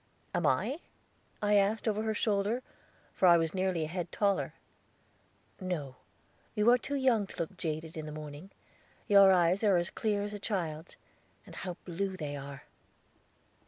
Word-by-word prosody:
"Am - - +1
I?" 285 +5 +1 0.6
I 210 0 +3
asked 205 +3 +1
over 215 -1 +1
her 220 0 -1
shoulder, 210 +4 0 0.5
for 185 - +3
I 170 -1 +8
was 165 -1 0
nearly 185 -3 0
a - - -2
head 175 +1 -4
taller. 200 -1 0 1.0
"No; 155 -9 -4 0.6
you 210 +3 +5
are 245 - +6
too 285 - -4
young 250 -7 +2
to - - -13
look 170 +3 -3
jaded 160 -2 -4
in 155 -1 -5
the - - -6
morning. 150 +3 -8 0.6
Your 200 -2 +8
eyes 180 +2 +3
are 200 -4 +5
as 175 +1 -1
clear 205 -2 0
as 205 0 -5
a 205 - -5
child's; 170 -6 -3 0.5
and - - -13
how 180 -2 -5
blue 190 +2 -3
they 145 -3 -4
are." 140 -1 -8
190 Hz, 165 wpm, -31 LUFS, 165-205 Hz, 1.0 s, I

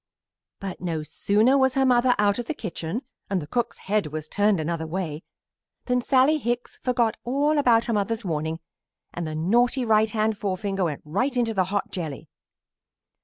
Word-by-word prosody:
But 195 -2 -6
no 165 -4 -2
sooner 215 - +2
was 265 0 +3
her 270 0 +3
mother 245 0 +4
out 205 +1 +2
of 240 - -3
the 310 - -3
kitchen 175 - -4 0.3
and 195 -1 +1
the 150 - -6
cook's 240 +9 -2
head 205 -3 -1
was 155 0 -5
turned 205 +1 +2
another 160 +1 -2
way 160 -3 -3 0.6
than 250 0 +1
Sallie 270 +5 +3
Hicks 240 -1 -3
forgot 240 -3 +1
all 290 +4 +1
about 235 -5 +4
her 235 - -1
mother's 215 +2 -1
warning, 160 -1 -2 0.5
and 170 -2 -4
the 155 - -4
naughty 240 - +2
right 220 -1 +4
hand 215 -1 0
forefinger 195 -1 -1
went 150 -4 -4
right 250 - -1
into 230 -2 +1
the 190 -3 +2
hot 200 +2 -2
jelly. 160 -4 -5
210 Hz, 175 wpm, -25 LUFS, 170-245 Hz, 0.6 s, mother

